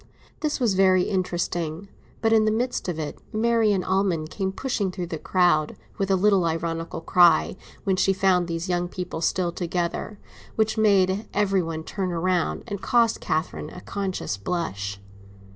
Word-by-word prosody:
This 300 -2 -1
was 235 -6 +2
very 185 -1 +4
interesting; 175 -2 -2 0.4
but 225 0 +4
in 220 -1 +5
the 215 - +3
midst 235 -3 -1
of 170 - -3
it 155 -2 -5
Marian 220 -3 +2
Almond 185 -5 0
came 190 -2 -2
pushing 210 -2 -2
through 180 -1 -4
the 165 -2 -5
crowd, 175 -5 +2 0.2
with 195 -1 0
a 195 - +4
little 190 -1 +3
ironical 165 0 -2
cry, 175 -1 +4 0.3
when 190 -2 +1
she 190 +1 +3
found 185 -2 +2
these 165 +1 -3
young 175 -1 0
people 180 -2 -5
still 175 +1 +1
together, 175 +4 -3 0.4
which 220 0 +1
made 200 -2 +3
every 195 -2 +2
one 165 -1 -4
turn 190 +2 -3
round, 175 0 0
and 205 -3 -5
cost 235 -2 +2
Catherine 155 +2 -2
a - - -10
conscious 190 - -3
blush. 100 - -3
185 Hz, 160 wpm, -25 LUFS, 170-200 Hz, 0.4 s, in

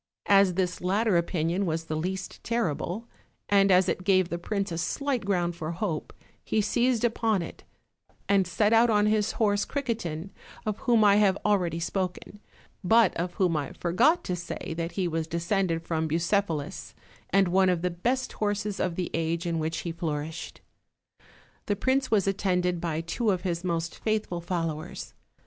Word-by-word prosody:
As 195 -3 +5
this 180 -1 -1
latter 200 +3 +2
opinion 170 +2 0
was 165 0 -1
the 155 -1 -4
least 180 +4 -4
terrible, 225 -1 -2 0.4
and 200 -1 +5
as 185 0 +5
it 185 - -1
gave 185 -2 +3
the 170 - -3
prince 200 +1 -2
a 165 - -3
slight 275 - -1
ground 175 -3 0
for 165 0 -4
hope, 170 -3 -3 0.3
he 220 - 0
seized 240 +3 +1
upon 225 -5 +1
it; - - -10 0.6
and 195 -2 +3
set 210 +4 +2
out 230 +1 +5
on 210 -1 +3
his 210 0 +1
horse 205 -2 +2
Criquetin, 200 - -3 0.3
of 215 -1 -2
whom 235 -3 +3
I 205 -1 +6
have 200 -2 +4
already 180 -5 +1
spoken, 185 +3 -3 0.4
but 220 +2 +4
of 175 +1 -3
whom 180 -5 +2
I 145 -2 -2
forgot 250 - +2
to 180 - -2
say 175 0 -5
that 165 +1 -3
he 185 -3 0
was 165 -1 -2
descended 170 0 0
from 160 -1 -1
Bucephalus, 165 -1 -1 0.3
and 195 -1 +3
one 190 +1 +4
of 175 -2 0
the 180 - +1
best 245 +9 -1
horses 205 -1 -2
of 180 -2 -1
the 180 0 -3
age 165 +1 -1
in 165 -1 -1
which 160 +1 -2
he 170 - -4
flourished. 160 -1 -5 1.1
The 205 - +1
prince 260 +5 +1
was 205 -3 +2
at 195 0 0
tended 180 -3 +1
by 165 -2 -1
two 210 +7 -1
of 185 -3 +1
his 175 -2 -2
most 165 -2 -2
faithful 215 -5 -1
followers. 170 +1 -4
185 Hz, 175 wpm, -27 LUFS, 170-210 Hz, 1.1 s, I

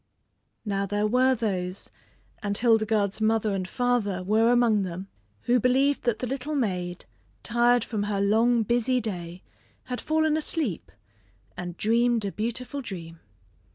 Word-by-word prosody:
Now 200 -1 -1
there 205 +2 0
were 255 +4 +3
those, 190 -5 -3 0.5
and 205 -1 -2
Hildegarde's 220 -3 +2
mother 220 -1 +2
and 185 -2 -2
father 225 -6 0
were 220 +4 +3
among 235 -4 +3
them, 185 +1 -5 0.3
who 245 +1 +2
believed 265 +4 +2
that 240 -3 +1
the 250 - -3
little 270 +4 -3
maid, 180 -8 -2 0.4
tired 240 0 +3
from 215 -3 -3
her 200 -1 -1
long 225 +4 +3
busy 245 +3 +1
day, 180 -5 -6 0.4
had 250 -1 -5
fallen 315 0 +1
asleep, 300 - -2 0.6
and 175 -1 -6
dreamed 230 0 +2
a 200 - -2
beautiful 245 +7 -3
dream. 170 -8 -8
220 Hz, 140 wpm, -26 LUFS, 200-245 Hz, 0.6 s, were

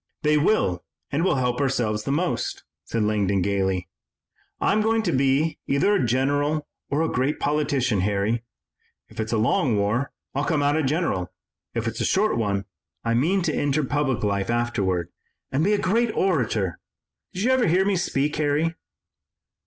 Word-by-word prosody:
"They 150 0 +3
will 145 - +2 0.3
and 145 +4 0
we'll 180 -4 +2
help 125 0 0
ourselves 115 -6 0
most," 165 +6 -1 0.2
said 115 -2 -1
Langdon 100 -3 +1
gaily. 95 -2 0 0.7
"I'm 215 +2 +2
going 225 +1 +2
to 180 - 0
be 135 +3 +1
either 140 +9 +2
a 200 - +2
general 145 +5 +1 0.2
or 145 +3 +1
a - - +1
great 135 +2 0
politician, 140 -8 +1
Harry. 105 +4 0 0.7
If - - -13
it's 110 0 -2
a 115 - +2
long 110 +1 +2
war, 110 +7 0 0.2
I'll 140 - -1
come 150 -2 +1
out 145 +1 +2
a 160 - +2
general; 145 - -1 0.4
if 115 0 -1
it's 115 0 -3
a - - +1
short 215 +3 +2
one, 100 -3 -1 0.4
I 115 - 0
mean 170 +11 +2
to - - 0
enter 145 +1 +1
public 140 -3 0
life 100 -1 0
afterward 100 -7 0 0.4
and 140 +4 +1
be 205 +4 +3
a - - +3
great 225 +4 +1
orator. 115 - 0 0.5
Did 185 - -3
you 255 - +3
ever 260 -4 +3
hear 185 +4 +3
me 200 -1 +2
speak, 150 -4 0
Harry?" 150 +2 +1
135 Hz, 170 wpm, -24 LUFS, 110-160 Hz, 0.7 s, They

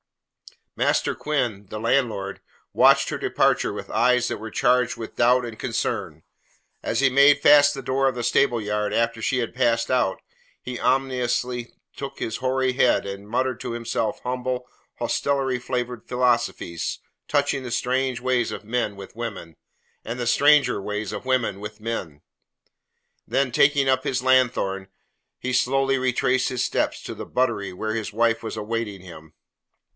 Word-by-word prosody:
Master - - +1
Quinn, 120 -10 -2
the 110 - -6
landlord, 110 -5 0 0.3
watched - - +5
her - - -3
departure - - +1
with - - -7
eyes 125 0 +3
that - - -3
were 110 +1 -7
charged 125 0 +2
with 115 - -8
doubt 125 +1 +4
and 115 -2 -8
concern. - - -3 0.6
As - - -1
he 135 - +5
made 140 +2 +6
fast 145 0 +7
the 135 - -5
door 135 +2 +1
of 130 - 0
the 120 - -3
stableyard 105 -4 +1
after 115 0 0
she 125 +3 0
had 115 - -3
passed 120 -2 +1
out, 125 -7 +1 0.4
he 125 -1 -6
ominously 125 -2 0 0.2
shook 140 0 -7
his 110 - -3
hoary 130 0 0
head 125 -4 +3
and 100 +1 -7
muttered 130 +1 -1
to 125 -2 -5
himself 115 -2 -2
humble, 125 0 -3 0.3
hostelry 135 -3 0
flavoured 125 -2 -4
philosophies 120 -9 0 0.3
touching 145 -2 +1
the 125 - -6
strange 125 +1 0
ways 125 -1 0
of - - -6
men 110 -2 -2
with 100 0 -11
women, 100 -9 -6 0.5
and 120 +2 -5
the 120 - -2
stranger 140 -2 +4
ways 105 0 -4
of 105 - -6
women 125 -6 0
with 105 +1 -8
men. 100 -10 -5 1.1
Then, 135 -2 +1
taking 140 +2 +3
up 130 0 +2
his 130 -3 -1
lanthorn, 120 -7 +2 0.5
he 130 - -3
slowly 135 +2 +2
retraced 130 0 +1
his 125 -2 -1
steps - - -1
to - - -6
the - - -7
buttery 115 -6 -1
where 110 +4 -3
his 110 -1 -3
wife 115 +1 +1
was 110 -1 -5
awaiting 110 -2 -3
him. 80 -4 -13
125 Hz, 160 wpm, -24 LUFS, 110-130 Hz, 1.1 s, fast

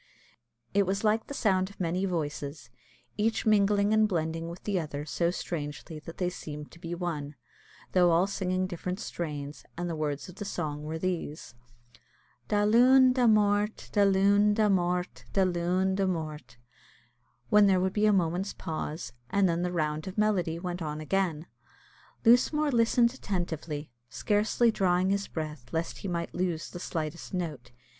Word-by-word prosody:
It 200 -1 +3
was 195 +2 -1
like 220 +1 +2
the 285 - -6
sound 190 -6 +2
of 200 - -17
many 180 +2 0
voices, 145 -6 -4 0.5
each 225 +2 0
mingling 205 -1 +3
and 215 -1 +4
blending 165 -2 -2
with 170 +2 -9
the 200 -3 0
other 150 -2 -5
so 170 +2 0
strangely 155 -3 -5
that 165 +2 -10
they 180 -1 0
seemed 150 -4 -8
to 170 - -15
be 170 0 -5
one, 155 -5 -4 0.6
though 180 -1 +5
all 170 +2 +4
singing 185 -2 -1
different 180 +1 -4
strains, 150 -8 -5
and 175 0 -2
the 170 - -3
words 150 -2 -3
of 180 0 -12
the - - -4
song 155 -7 -3
were 160 +1 -3
these 165 -7 -4 0.9
Da 205 0 +2
Luan, 255 +4 +6
Da 250 -2 +3
Mort, 210 -1 +2
Da 205 - +3
Luan, 200 +1 +4
Da 215 -1 +3
Mort, 180 -1 0
Da 195 - +4
Luan, 180 +1 +1
Da 195 0 +1
Mort; 155 -7 -4 0.9
when 210 -1 +7
there 190 -2 +4
would 190 +1 0
be 215 0 +3
a - - +5
moment's 185 +1 0
pause, 155 -5 -5 0.2
and 200 -1 +3
then 170 0 0
the 180 0 -1
round 155 -2 -1
of 190 - -7
melody 190 -6 +1
went 175 0 -4
on 150 -1 -3
again. 165 -1 -1 0.8
Lusmore 285 +6 +4
listened 235 0 +3
attentively, 165 - -4 0.2
scarcely 215 - +2
drawing 185 -2 +2
his 200 0 0
breath 150 -6 -6
lest 165 +1 -2
he - - -5
might 170 -2 -3
lose 175 -3 -2
the 175 - -7
slightest 165 +1 -4
note. 155 -9 -4
180 Hz, 165 wpm, -29 LUFS, 160-200 Hz, 0.9 s, when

